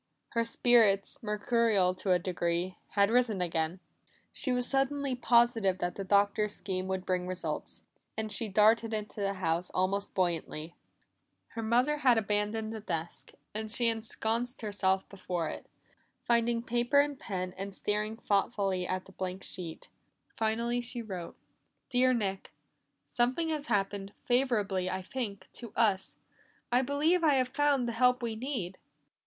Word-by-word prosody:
Her 230 - +1
spirits, 230 -4 +3
mercurial 210 -3 +2
to 185 +1 -2
a 180 - +6
degree, 175 0 -2 0.2
had 200 +1 +4
risen 235 -5 +2
again. 165 0 -1 0.5
She 260 - -2
was 250 0 +1
suddenly 275 0 +1
positive 235 -6 +3
that 175 -1 -2
the 195 - -5
Doctor's 205 +2 +2
scheme 185 0 -3
would 190 -1 -2
bring 180 -1 -1
results, 185 0 -4 0.3
and 220 -1 -3
she 220 +2 0
darted 220 +2 +4
into 210 0 -5
the 195 0 0
house 175 -1 0
almost 195 +2 0
buoyantly. 170 -3 -1 0.8
Her 230 - -5
mother 245 +7 +2
had 255 -5 +4
abandoned 215 +1 -1
the 220 - -5
desk, 165 -5 -4 0.2
and 215 +1 -4
she 235 +1 +3
ensconced 225 +2 -1
herself 190 -2 +1
before 180 -4 -3
it, - - -8 0.6
finding 235 0 +2
paper 240 +4 +2
and 285 -1 +1
pen, 185 -3 -4
and 195 0 -6
staring 210 +2 -2
thoughtfully 195 -4 0
at 185 0 -2
the - - -15
blank 185 0 -5
sheet. 170 -4 -5 0.5
Finally 235 +2 0
she 240 0 -6
wrote. 185 -6 -6 0.6
"Dear 255 0 +4
Nick 195 -6 -2 0.6
"Something 255 +7 +1
has 305 -2 -2
happened, 200 0 -1
favorable, 240 -6 +1
I 185 0 -3
think, 200 -3 -5
to 235 -3 -9
us. 205 -5 +1 0.6
I 245 +1 +4
believe 300 +6 +2
I 300 -3 +5
have 255 -1 +2
found 280 -2 +2
the - - -1
help 250 +2 +3
we 230 -2 -2
need. 220 -7 -4
215 Hz, 150 wpm, -31 LUFS, 190-240 Hz, 0.8 s, a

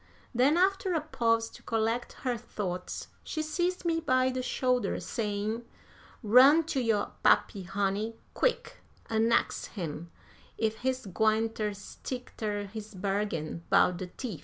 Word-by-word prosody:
Then, 265 +6 +4
after 380 0 +2
a 320 - +1
pause 230 -6 +1
to - - -13
collect 225 +2 -1
her 250 -1 +1
thoughts, 185 -5 -5
she 310 - -3
seized 350 +4 -1
me 330 -1 +2
by 255 -4 +2
the 255 0 -2
shoulder, 250 -1 0
saying: 215 +1 -2 0.6
"Run 260 +9 +7
to 265 - +1
yo' 225 -3 +1
pappy, 200 - +3
honey, 200 +4 -1 0.2
quick, - - 0 0.3
an' 225 +1 +3
ax - - +1
him 170 -1 -4 0.5
ef 220 -1 0
he's 260 0 -1
gwine 220 +3 +2
ter 215 -2 -2
stick 250 +5 -7
ter 210 -2 -2
his 215 +1 -8
bargain 190 -4 -2
'bout 180 - +4
de 185 - -5
teef. 200 - -6
225 Hz, 145 wpm, -30 LUFS, 205-255 Hz, 0.6 s, Run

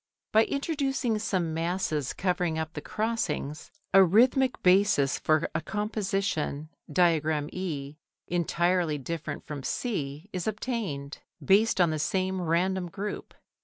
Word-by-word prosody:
By 220 +1 +5
introducing 275 -6 -1
some 185 -7 -1
masses 165 -4 -1
covering 180 -3 0
up 160 0 -3
the 150 - -5
crossings, 210 -10 -2 0.2
a 195 0 +9
rhythmic 250 - +3
basis 180 -7 +4
for 155 -1 +2
a 160 - -1
composition 195 -7 -2 0.2
(Diagram 155 -3 +2
E) 150 -6 -4 0.3
entirely 175 -1 +1
different 155 +1 -5
from 145 -2 -6
C 150 - -3
is 180 0 -3
obtained, 210 - -3 0.3
based 210 +2 +4
on 175 -3 +4
the 155 - -2
same 185 +3 0
random 180 +2 0
group. 205 +4 -6
180 Hz, 125 wpm, -28 LUFS, 155-205 Hz, 0.3 s, a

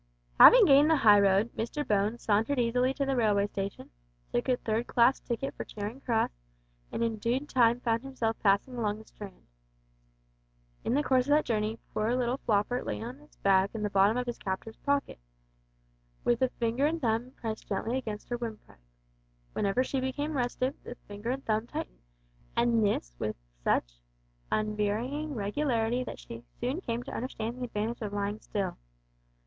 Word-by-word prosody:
Having - - +10
gained 285 -1 +6
the 320 - +5
high 210 -7 +6
road, 200 +3 +3
Mr 265 +6 -3
Bones 210 +3 +1
sauntered 220 +6 +2
easily 250 +2 +2
to 275 - 0
the 270 0 0
railway 210 -4 +3
station, 195 -1 -5 0.4
took 120 - 0
a 250 - +3
third 225 +1 -1
class 245 +2 +4
ticket 245 +3 -3
for - - -5
Charing 215 +5 -6
Cross, 230 -4 +1 0.6
and 230 - -1
in 225 -1 -1
due 235 +5 0
time 240 -3 +3
found 230 -1 +1
himself 245 -4 -2
passing 205 +5 +2
along 210 -3 -1
the 220 - -13
Strand. 200 -4 -11 1.4
In 240 - 0
the 295 - +2
course 260 -1 +2
of 290 - +4
that 305 - +2
journey 220 -1 -1 0.2
poor 220 +3 +1
little 250 +1 0
Floppart 215 +4 0
lay - - -2
on 245 +5 -7
its 300 0 -21
back 195 +1 +2
in 215 - -3
the 210 - -1
bottom 200 +4 +4
of 250 0 -2
its 240 - -4
captor's 195 +3 -4
pocket, 280 - -1 1.0
with 240 0 +2
a 260 - +3
finger 240 +4 0
and 330 +2 -1
thumb 240 -1 0 0.4
gently 230 +6 -1
pressing 210 -3 -6
her 240 - -1
windpipe. 225 - -8 0.7
Whenever 205 +6 +1
she 265 +1 -2
became 285 +4 -2
restive, 255 +1 0
the 245 - -8
finger 205 +3 -6
and 270 +2 -3
thumb 220 +1 0
tightened, 315 +4 -6 0.5
and 235 -2 +3
this - - 0
with - - -2 0.3
such - - 0 0.5
unvarying 215 +8 -1
regularity 230 +2 0
that - - -7
she 115 0 -10 0.2
soon 260 +9 -2
came 235 -6 -3
to - - -8
understand 235 -1 -4
the 250 - -2
advantage 230 +1 -3
of 210 -2 -4
lying 205 +1 -2
still. 195 -5 -3
230 Hz, 175 wpm, -29 LUFS, 210-255 Hz, 1.4 s, Having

